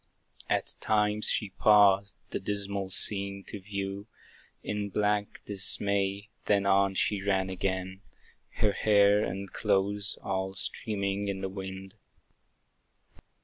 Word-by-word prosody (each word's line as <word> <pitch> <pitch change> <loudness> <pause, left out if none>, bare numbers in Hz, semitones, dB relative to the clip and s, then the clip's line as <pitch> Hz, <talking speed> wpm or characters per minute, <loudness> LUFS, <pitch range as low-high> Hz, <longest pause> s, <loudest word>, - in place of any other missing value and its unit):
At - - 0
times 105 0 +2
she 105 -3 0
paused, 100 -2 +4 0.2
the - - -2
dismal 100 -1 -3
scene 100 0 -1
to 105 - -7
view, 100 +1 -5 0.6
In 105 -1 -3
blank 105 +1 0
dismay; 100 0 +1 0.2
then 100 -1 +2
on 100 0 +3
she 100 +1 0
ran 95 -1 0
again, 95 0 -3 0.5
Her 105 - +2
hair 105 0 +4
and 95 0 -5
clothes 100 0 0
all 95 0 -2
streaming 100 0 -2
in 95 -1 -3
the 95 - -2
wind. 95 0 -7
100 Hz, 115 wpm, -29 LUFS, 95-105 Hz, 0.6 s, paused